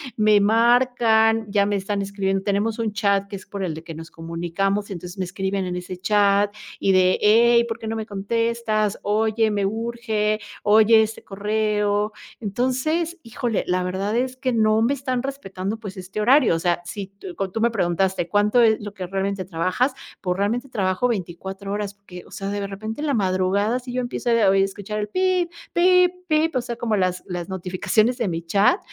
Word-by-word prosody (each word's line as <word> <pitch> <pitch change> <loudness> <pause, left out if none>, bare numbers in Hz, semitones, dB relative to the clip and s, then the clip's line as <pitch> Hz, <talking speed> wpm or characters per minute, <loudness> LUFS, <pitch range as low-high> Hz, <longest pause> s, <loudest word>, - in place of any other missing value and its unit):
me 215 -1 +4
marcan, 225 0 +3
ya 200 -1 +3
me 205 - 0
están 200 +1 -2
escribiendo. 195 -1 -1
Tenemos 210 +3 0
un 220 -2 -1
chat 200 -2 +1
que 200 - -7
es 190 - -9
por 200 0 -5
el 160 -1 -5
que 165 -1 -8
nos 165 +1 -10
comunicamos, 175 +5 -2
entonces 180 0 -7
me 190 - -2
escriben 190 +1 -2
en 180 - -3
ese 180 +1 -6
chat, 205 +1 +2 0.2
y 195 - +2
de: 185 0 +4
"Hey, 235 +2 +5
¿por 230 0 -5
qué 220 - -7
no 225 - -2
me 220 - -4
contestas? 215 0 -1
Oye, 220 +1 +2
me 200 -2 0
urge. 220 -1 -1 0.2
Oye, 220 +1 +6
este 220 0 -3
correo", 210 0 0 0.3
entonces, 260 - -1
híjole, 235 -2 -2
la 180 0 +1
verdad 190 +4 -2
es 255 +1 -1
que 255 -1 -1
no 215 -1 +3
me 255 +5 +2
están 255 -2 -2
respetando, 210 -7 -4
pues, 205 -4 -8
este 190 +3 -5
horario. 255 - +5
O 165 - -1
sea, 175 0 0
si 195 +1 -6 0.2
con 195 -1 -3
tú 225 - -3
me 235 0 +3
preguntaste: 185 -2 0
¿cuánto 210 +4 +3
es 220 -2 +5
lo 205 -1 -7
que 185 -3 -6
realmente 195 0 -2
trabajas? 185 - 0 0.3
Pues 180 -1 -1
realmente 235 +7 -1
trabajo 195 0 0
24 195 -1 -4
horas, 205 -1 -3
porque, 180 -3 -12
o - - -19
sea, 195 0 -5
de 200 0 -2
repente 215 +6 -6
en 305 - -1
la 285 - +1
madrugada, 195 +4 +1
si 250 0 -9
yo 255 - -1
empiezo 245 0 -3
a 230 -4 +4
oi 195 0 +4
escuchar 205 +2 -4
pip, 370 0 +1 0.2
pip, 360 0 +5 0.2
pip, 310 0 +1
o 255 - +2
sea, 240 0 -5
como 225 -2 -1
las 185 -2 0
las 175 0 -5
notificaciones 190 +6 0
de 230 - 0
mi 165 -2 -2
chat, 200 - +3
210 Hz, 195 wpm, -23 LUFS, 195-230 Hz, 0.3 s, Oye